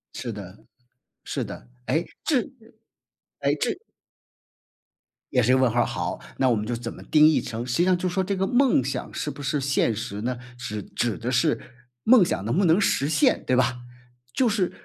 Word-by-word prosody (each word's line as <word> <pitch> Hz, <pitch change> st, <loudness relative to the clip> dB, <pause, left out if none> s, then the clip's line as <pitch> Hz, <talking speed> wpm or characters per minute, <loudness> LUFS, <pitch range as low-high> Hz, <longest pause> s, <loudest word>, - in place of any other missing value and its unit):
是 120 Hz, -3 st, -4 dB
的。 100 Hz, -1 st, -9 dB, 0.7 s
是 -, -, -2 dB
的， -, -, -9 dB, 0.2 s
哎， 165 Hz, +2 st, +1 dB, 0.2 s
这 280 Hz, -6 st, +2 dB, 1.0 s
哎， -, -, +2 dB
这 -, -, -1 dB, 1.5 s
也 125 Hz, -, +3 dB
是 125 Hz, +2 st, +3 dB
一 -, -, +5 dB
个 130 Hz, -, +3 dB
问 130 Hz, -, +4 dB
号 120 Hz, +1 st, +2 dB
儿， -, -, +2 dB
好。 -, -, -3 dB, 0.2 s
那 130 Hz, -, +3 dB
我 120 Hz, -, +3 dB
们 105 Hz, 0 st, -2 dB
就 120 Hz, -, -2 dB
怎 115 Hz, 0 st, -6 dB
么 -, -, -12 dB
定 155 Hz, 0 st, +5 dB
义 155 Hz, -, +3 dB
成 120 Hz, 0 st, -5 dB
实 125 Hz, -, -1 dB
际 175 Hz, -, +3 dB
上 185 Hz, -1 st, +3 dB
就 180 Hz, +1 st, -2 dB
说 190 Hz, +1 st, 0 dB
这 200 Hz, +1 st, -1 dB
个 190 Hz, 0 st, 0 dB
梦 245 Hz, -, +3 dB
想 130 Hz, -, -4 dB
是 150 Hz, -, -3 dB
不 -, -, -10 dB
是 145 Hz, +1 st, 0 dB
现 135 Hz, -5 st, +1 dB
实 105 Hz, -2 st, -5 dB
呢？ 125 Hz, +2 st, -2 dB, 0.2 s
指 105 Hz, -4 st, -5 dB
指 115 Hz, -1 st, -2 dB
的 120 Hz, +2 st, -3 dB
是 135 Hz, +5 st, +2 dB, 0.4 s
梦 230 Hz, -4 st, +7 dB
想 100 Hz, -, -1 dB
能 120 Hz, +10 st, 0 dB
不 195 Hz, -, +3 dB
能 165 Hz, +4 st, +5 dB
实 145 Hz, -7 st, +1 dB
现， 145 Hz, -, +3 dB
对 130 Hz, -, +2 dB
吧？ 125 Hz, 0 st, +2 dB, 0.6 s
就 260 Hz, -, +2 dB
是 200 Hz, -5 st, 0 dB
130 Hz, 220 characters per minute, -25 LUFS, 120-175 Hz, 1.5 s, 梦